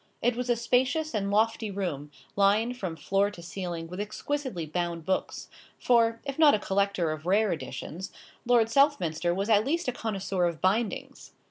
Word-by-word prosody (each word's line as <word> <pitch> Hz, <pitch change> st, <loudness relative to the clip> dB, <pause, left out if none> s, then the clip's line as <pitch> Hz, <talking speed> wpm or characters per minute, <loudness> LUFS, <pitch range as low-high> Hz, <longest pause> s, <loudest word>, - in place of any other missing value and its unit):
It 240 Hz, 0 st, +1 dB
was 250 Hz, +1 st, -3 dB
a 240 Hz, -, +4 dB
spacious 260 Hz, +7 st, +1 dB
and 200 Hz, -2 st, -1 dB
lofty 220 Hz, +1 st, +1 dB
room, 175 Hz, -8 st, -4 dB, 0.3 s
lined 210 Hz, +5 st, +3 dB
from 185 Hz, -8 st, -4 dB
floor 195 Hz, +4 st, +1 dB
to 205 Hz, -4 st, -11 dB
ceiling 170 Hz, -2 st, -5 dB
with 180 Hz, +3 st, -8 dB
exquisitely 215 Hz, -, -3 dB
bound 170 Hz, 0 st, -3 dB
books; 190 Hz, -, -2 dB, 0.3 s
for, 230 Hz, -2 st, +3 dB
if 275 Hz, +1 st, -5 dB
not 300 Hz, -5 st, +7 dB
a -, -, -1 dB
collector 195 Hz, -4 st, 0 dB
of 155 Hz, +2 st, -6 dB
rare 210 Hz, +2 st, +3 dB
editions, 160 Hz, +3 st, -6 dB, 0.3 s
Lord 235 Hz, -2 st, +4 dB
Southminster 205 Hz, -, +2 dB
was 195 Hz, +3 st, -1 dB
at 215 Hz, -2 st, +4 dB
least 330 Hz, +6 st, -1 dB
a -, -, +2 dB
connoisseur 195 Hz, -6 st, -2 dB
of 170 Hz, -2 st, -4 dB
bindings. 205 Hz, +3 st, -1 dB
200 Hz, 170 wpm, -28 LUFS, 175-235 Hz, 0.3 s, not